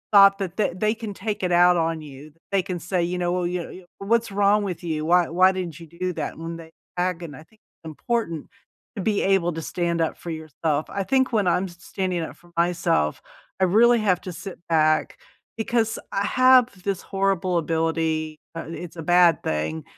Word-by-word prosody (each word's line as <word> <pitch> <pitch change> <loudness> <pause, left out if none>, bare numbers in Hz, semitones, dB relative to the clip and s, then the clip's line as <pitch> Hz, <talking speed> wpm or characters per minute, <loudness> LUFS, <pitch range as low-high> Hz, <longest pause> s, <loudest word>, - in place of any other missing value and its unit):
thought 195 0 +8
that 185 -3 -4
th 205 -5 +1
they 215 +1 +2
can 220 -3 -6
take 205 0 -4
it 180 - 0
out 175 +1 +6
on 165 -1 0
you. 145 +1 -11 0.2
They 195 - +4
can 180 -3 -4
say, 175 +1 -1
"You 180 +1 -2
know, 175 0 0
well, 180 -1 0
you 180 -1 -3
you, 185 -1 -11
what's 225 +2 +1
wrong 205 +1 +3
with 185 -4 -4
you? 155 -2 -2
Why 175 0 +4
why 185 +3 +5
didn't 175 -4 -5
you 165 - -10
do 180 +3 -4
that?" - - -4
And 165 +1 -6
they 160 0 -12 0.3
agoni 175 -5 -2
I 155 - -12
think 215 +6 -28 0.3
important 165 - -3 0.5
to - - -2
be 210 -2 +1
able 190 -3 +2
to 165 - -5
stand 170 0 -1
up 160 - 0
for 170 - -8
yourself. 155 -1 -2
I 200 - -3
think 260 +1 +1
when 205 -4 +2
I'm 180 +2 +2
s 175 -2 -10
standing 180 -1 -3
up 160 - -6
for 175 0 -22
myself, 170 - +1 0.4
I - - +6
really 235 +6 +5
have 185 -4 +1
to 185 - -6
sit 190 +2 -8
back, 155 -1 +2 0.4
because 225 0 0
I 200 +1 0
have 255 -6 +4
this 195 -2 -2
horrible 195 -2 0
ability 160 -1 -1 0.2
uh, - - -3
i - - -12
it's 170 0 -7
a - - -4
bad 175 -1 +5
thing- 80 +1 -2
180 Hz, 205 wpm, -24 LUFS, 165-195 Hz, 0.5 s, thought